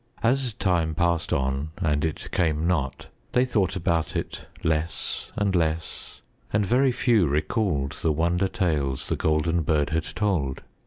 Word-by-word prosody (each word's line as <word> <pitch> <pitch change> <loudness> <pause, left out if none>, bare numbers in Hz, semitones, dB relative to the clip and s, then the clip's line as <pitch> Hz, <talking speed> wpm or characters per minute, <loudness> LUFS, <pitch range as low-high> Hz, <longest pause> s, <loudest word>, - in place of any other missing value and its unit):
As 125 0 +2
time 85 -6 0
passed 85 0 +1
on 70 +3 -1
and 75 -6 0
it 80 -2 -3
came 80 -1 +1
not, 75 -7 -1 0.3
they 125 +1 +4
thought 100 -7 +1
about 85 -3 0
it - - -4 0.2
less 80 +1 -2
and 100 -2 +1
less 80 -2 -2 0.3
and 105 0 +2
very 130 +5 +3
few 115 -7 +3
recalled 75 - 0
the 80 - 0
wonder 85 +5 +1
tales 75 -10 -1
The - - +1
Golden 80 +2 +1
Bird 75 -1 +1
had 80 0 0
told. 90 -11 -1
85 Hz, 150 wpm, -25 LUFS, 75-95 Hz, 0.3 s, they